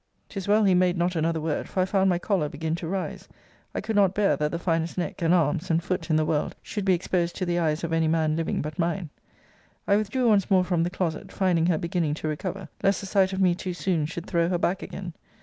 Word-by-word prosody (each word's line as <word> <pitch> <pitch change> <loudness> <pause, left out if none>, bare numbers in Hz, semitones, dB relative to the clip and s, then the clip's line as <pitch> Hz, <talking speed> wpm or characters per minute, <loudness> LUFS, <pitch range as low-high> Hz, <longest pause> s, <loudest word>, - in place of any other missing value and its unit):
'Tis 195 -2 -6
well 210 +1 +4
he 195 -2 +4
made 180 0 +3
not 175 +1 0
another 165 0 0
word: 155 -1 -2
for - - -3
I 185 - +4
found 190 0 +2
my 175 - +2
choler 175 -4 0
begin 160 +2 -3
to 170 0 -4
rise. 190 +1 -4 0.5
I - - -1
could 220 - -3
not 195 -2 +4
bear, 200 -7 +3
that 150 +1 0
the 170 - -3
finest 165 -1 -1
neck, 180 0 -3
and 165 0 +2
arms, 170 0 +2
and 165 0 +2
foot, 185 0 -3
in 155 - +3
the 155 0 +2
world, 155 -1 -1
should 205 -3 -4
be 190 -2 +4
exposed 175 -1 -1
to 185 - -2
the 175 0 0
eyes 155 -1 0
of 165 -1 -2
any 165 -1 +2
man 155 -1 +1
living 165 -3 -1
but 155 +4 -6
mine. 170 -1 -1 0.8
I 200 - +4
withdrew 225 +4 0
once 205 -3 +3
more 190 -2 +4
from 180 -2 0
the 170 - +1
closet, 180 -3 -3
finding 175 -4 +2
her 175 -3 +2
beginning 170 -2 -1
to 155 - -4
recover, 180 +5 -4
lest 195 +1 +2
the - - -6
sight 190 -1 +2
of 190 - -3
me 180 -2 +4
too 180 0 -5
soon 175 -5 0
should 170 +1 -6
throw 170 -1 +1
her 180 - +1
back 180 +2 0
again. 180 -3 -7
175 Hz, 255 wpm, -26 LUFS, 165-190 Hz, 0.8 s, well